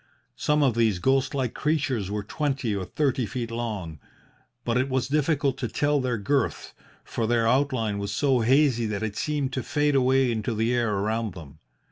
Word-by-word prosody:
Some 150 0 +1
of 130 -4 +3
these 110 -4 +2
ghost 135 +7 +1
like 130 -4 -1
creatures 145 - -1
were 105 0 -3
twenty 135 -2 -2
or 95 -2 -3
thirty 130 -1 0
feet 115 +1 -4
long, 105 -10 -4 0.7
but 115 - 0
it 130 +2 +1
was 130 -1 0
difficult 145 -1 +1
to 120 - -1
tell 145 +5 +1
their 125 -2 -1
girth, 125 +5 -1 0.3
for 115 - -2
their 115 -1 +2
outline 120 -5 +1
was 100 0 -3
so 135 +4 +2
hazy 125 -1 +3
that 105 0 -3
it 110 -2 -3
seemed 145 -3 -2
to 130 - -1
fade 145 +4 0
away 130 -1 +3
into 110 0 -2
the 115 +3 +1
air 120 -2 +1
around 105 0 -1
them. 75 -4 -11
120 Hz, 185 wpm, -26 LUFS, 110-135 Hz, 0.7 s, of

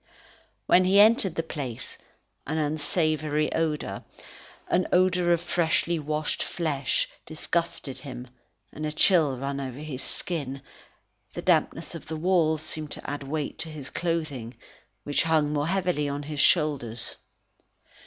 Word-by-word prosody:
When 185 - +6
he 195 +2 +5
entered 205 -5 +5
the 165 - 0
place 140 -8 -5 0.5
an 155 +3 -1
unsavoury 155 0 0
odour, 155 -2 -1 0.6
an 185 - +2
odour 180 -1 +3
of 170 -1 +3
freshly 170 -1 +1
washed 150 0 -1
flesh, 145 -6 0 0.2
disgusted 155 -3 -2
him 130 -2 -8 0.5
and 155 +1 -3
a - - -2
chill 155 -4 +4
ran 140 +2 -3
over 130 -2 -5
his 145 -3 -5
skin: 140 -6 -4 0.7
the - - -4
dampness - - +1
of - - -8
the 160 - -4
walls 160 -2 +2
seemed 155 -1 -2
to - - -7
add 145 0 -3
weight 145 +1 -3
to 165 - -1
his 150 -4 -7
clothing, 155 -9 -2 0.5
which 145 - +1
hung 155 -2 +2
more 145 0 0
heavily 180 -5 +1
on 140 +1 -3
his 150 0 -5
shoulders. 140 -9 +2
155 Hz, 140 wpm, -27 LUFS, 145-170 Hz, 0.7 s, When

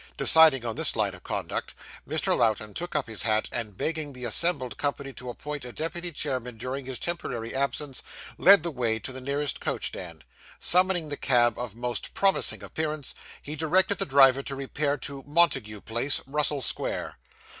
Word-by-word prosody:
Deciding 155 -6 +7
on 115 -2 -2
this - - +3
line - - 0
of - - -11
conduct, - - -4 0.3
Mr. - - +1
Lowten 110 -2 +1
took 175 +1 -6
up - - +1
his 110 -5 -1
hat, 110 0 +1
and 110 -5 -4
begging 155 -3 0
the 125 -1 -5
assembled 130 +1 +2
company 140 -1 -3
to 125 -1 -8
appoint 150 +3 -6
a 125 - -6
deputy 170 +5 -4
chairman 130 -6 -3
during 130 +3 -5
his 130 -1 -5
temporary 120 -9 -4
absence, 140 0 -2 0.4
led 195 -4 +7
the 170 - -1
way 120 -5 0
to 110 - -6
the 130 0 -6
nearest 140 +1 -2
coach - - -2
stand. 85 -5 -8 0.3
Summoning 180 -3 +2
the 145 - -4
cab 120 -3 +3
of 120 -4 -5
most 120 0 -4
promising 195 -1 +2
appearance, 155 -3 -3 0.3
he 150 - -6
directed 185 +5 +1
the - - 0
driver 135 -1 +5
to 140 0 -6
repair 140 +2 -1
to 140 -2 -7
Montague 140 -10 +2
Place, 120 +5 0
Russell 145 0 0
Square. - - -2
135 Hz, 175 wpm, -26 LUFS, 120-155 Hz, 0.4 s, Deciding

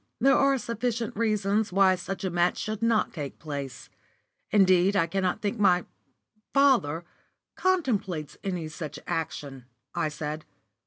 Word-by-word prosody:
"There 270 +2 +5
are 275 0 +4
sufficient 235 -1 -2
reasons 215 -1 +1
why 190 0 +5
such 195 +1 -5
a 190 - -1
match 175 +1 +2
should 215 -1 -4
not 230 -2 +2
take 145 -5 -6
place. 140 -4 -6 0.6
Indeed, 190 -1 +4
I 175 -4 +4
cannot 185 +4 -1
think 210 +2 -1
my 180 -3 +4 0.7
father 235 - +3 0.5
contemplates 210 - 0
any 180 -5 -3
such 155 -1 -7
action," 140 -5 -4 0.3
I 155 - 0
said. 150 +1 -5
190 Hz, 130 wpm, -27 LUFS, 160-220 Hz, 0.7 s, There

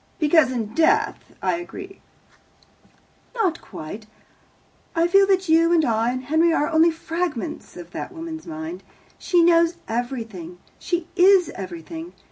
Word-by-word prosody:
"Because 305 -4 +4
in 225 -4 -3
death 420 - +1
I - - +1
agree." 375 +2 -9 1.3
"Not 370 -8 0
quite. 205 +8 -9 0.9
I 330 +1 +3
feel 390 +2 +5
that 380 -1 +2
you 330 +1 +4
and 330 -3 +4
I 225 -1 +1
and 255 +1 -4
Henry 320 +5 +3
are 300 -2 +1
only 320 +1 +5
fragments 325 - -4
of 175 -1 -10
that - - -6
woman's 325 -2 -7
mind. 320 +2 -6 0.4
She 350 -2 +3
knows 335 0 +4
everything. 225 -8 -4 0.2
She 345 -1 -2
is 375 -1 +5
everything. 195 - -8
325 Hz, 135 wpm, -23 LUFS, 245-345 Hz, 1.3 s, feel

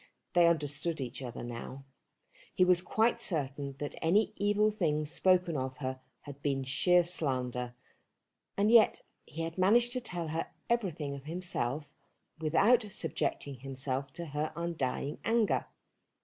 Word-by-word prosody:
They 175 -1 +6
understood 155 0 0
each 130 0 -5
other 125 -2 -6
now. 120 +3 -7 0.7
He 185 - +5
was 180 -1 +5
quite 225 +5 +1
certain 140 -4 -3
that 145 +1 -4
any 200 +7 +3
evil 205 +1 +2
thing 155 -7 0
spoken 180 +2 +2
of 130 -1 -3
her 130 -1 -4 0.2
had 140 -1 -10
been 135 -2 0
sheer 175 +7 +4
slander, 125 -7 -2 0.8
and 205 +2 +3
yet 230 -2 +6 0.2
he 165 +2 -5
had 165 +2 -5
managed 235 +6 +4
to 255 - -1
tell 175 -8 -4
her 160 +1 -2 0.2
everything 175 -11 0
of 140 0 -8
himself 155 -5 -3 0.5
without 165 +10 +4
subjecting 145 -6 -3
himself 135 0 -3
to 170 - -6
her 150 0 -2
undying 155 -4 -2
anger. 225 -2 +2
160 Hz, 140 wpm, -32 LUFS, 135-185 Hz, 0.8 s, They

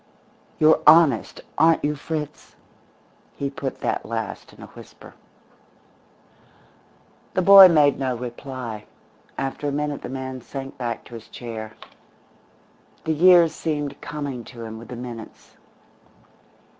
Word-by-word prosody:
You're 155 0 +4
honest, 155 -7 +5 0.2
aren't 160 -2 +4
you, 150 - 0
Fritz?" 150 0 -6 0.8
He 140 -1 -4
put 135 -1 -6
that - - -2
last 115 -2 -6
in - - -14
a - - -8
whisper. - - -15 2.2
The 185 - +1
boy 195 0 +10
made 150 -5 +3
no 130 -2 -2
reply; 120 -3 -7 0.5
after 135 +2 -3
a - - -1
minute 145 0 -3
the - - -7
man 130 0 -6
sank 135 +2 -8
back 120 -2 -4
to - - -14
his 115 -1 -10
chair. 110 -2 -8 1.3
The 160 - 0
years 170 0 +6
seemed 145 -4 -4
coming 140 -5 -5
to 120 -2 -10
him 110 0 -8
with 115 - -12
the 125 - -8
minutes. 120 -2 -10
135 Hz, 130 wpm, -23 LUFS, 120-150 Hz, 2.2 s, boy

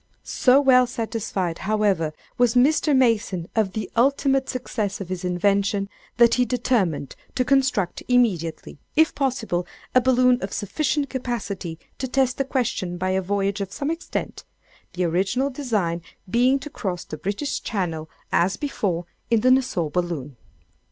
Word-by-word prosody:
"So 255 +2 +4
well 255 -3 +5
satisfied, 220 -7 -3
however, 200 -6 +1 0.2
was 245 -1 +2
Mr. 290 +2 +4
Mason 210 -8 +1
of 210 -4 +1
the 215 - -3
ultimate 270 +2 +2
success 215 -5 -3
of 190 -3 -6
his 185 0 -4
invention, 200 +2 +1 0.3
that 235 -1 +6
he 250 - +3
determined 225 - 0 0.2
to 255 - +1
construct 260 -10 +1
immediately, 190 - +1 0.2
if 320 0 +4
possible, 245 -10 -1 0.3
a 255 - +6
balloon 250 0 +4
of 195 - -4
sufficient 285 - -1
capacity 205 -10 -4 0.2
to 260 - -2
test 260 0 +1
the 275 - +1
question 235 -9 -1
by 185 +1 -1
a 190 0 +1
voyage 200 +1 -1
of 195 -1 -4
some 285 +8 -2
extent—the 330 - -6
original 195 +11 +1
design 210 -11 -1 0.3
being 250 +7 +3
to 300 - -8
cross 180 -8 -4
the - - -7
British 205 +9 -2
Channel, 165 -7 -3 0.2
as 185 +3 +2
before, 190 - -2 0.2
in 230 -2 +3
the 255 - +4
Nassau 245 - +1
balloon. 165 -6 -2
215 Hz, 145 wpm, -23 LUFS, 185-255 Hz, 0.3 s, that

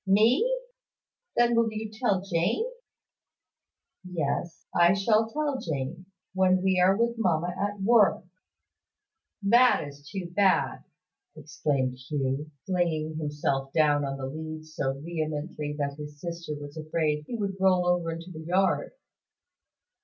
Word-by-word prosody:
"Me! 250 - +3 0.7
Then 240 0 +4
will 230 -1 +3
you 220 0 -4
tell 215 -5 +1
Jane?" 190 - 0 1.4
"Yes. 170 -2 -3
I 175 +1 +5
shall 215 +3 +2
tell 290 0 -1
Jane, 160 - -4 0.3
when 185 -1 +3
we 190 -1 +3
are 190 +2 +5
with 235 0 0
mamma 175 -3 +1
at 205 +1 -2
work." 210 +1 +4 1.2
"That 235 -4 +5
is 145 0 -12
too 175 0 -5
bad!" 190 -2 +2 0.5
exclaimed 135 -4 -2
Hugh, 135 +2 -2 0.2
flinging 160 -4 -1
himself 145 -3 -2
down 150 -2 +3
on 135 0 -3
the 135 - -4
leads 155 +2 -7
so 135 -2 -2
vehemently 155 -1 -3
that 140 -1 -2
his 150 0 -8
sister 170 -2 -5
was 145 0 -9
afraid 155 -1 -1
he 240 - -4
would 200 -3 -3
roll 185 -2 +4
over 175 -1 +1
into 165 +2 -6
the 155 - -8
yard. 185 - +1
170 Hz, 130 wpm, -27 LUFS, 150-195 Hz, 1.4 s, I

